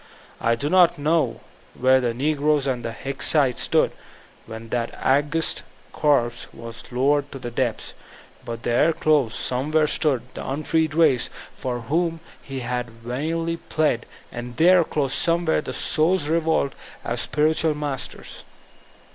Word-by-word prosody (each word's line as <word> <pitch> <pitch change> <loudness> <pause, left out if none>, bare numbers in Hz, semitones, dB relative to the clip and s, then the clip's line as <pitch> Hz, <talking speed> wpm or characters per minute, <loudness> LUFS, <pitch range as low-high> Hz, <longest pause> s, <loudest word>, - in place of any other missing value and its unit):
I 115 0 +2
do 140 +5 -3
not 180 +1 +5
know 145 -5 0 0.4
where 130 +1 +4
the 120 -2 0
negroes 145 +3 +1
and 125 -3 -2
the 115 - -3
Hicksite 135 +1 +1
stood - - +2 0.6
when 115 0 -9
that 115 -1 -2
august 145 +4 +2 0.3
corpse 120 -6 +1
was 115 -1 -9
lowered 140 +3 +1
to - - -7
the 120 -2 -6
depths, 120 -2 -2 0.5
but 115 0 -6
there, 125 +7 +3
close, 150 -7 +2
somewhere, 150 +5 +1
stood 145 -4 +1
the - - -6
unfreed 155 +2 -1
race, 145 -7 +3 0.2
for 125 -2 -4
whom 165 +7 -1 0.2
he 135 -1 -6
had 125 0 -3
vainly 150 +9 -3
plead, 155 -7 -1 0.2
and 120 0 -7
there, 175 +3 +6
close, 140 -4 -1
somewhere, 170 -2 +2
the - - -6
soul's 160 0 +1
re 165 +2 +2
volt 160 -4 0 0.3
at 120 +1 -2
spiritual 155 +3 +1
masters. 145 -4 -5
140 Hz, 140 wpm, -23 LUFS, 120-155 Hz, 0.6 s, there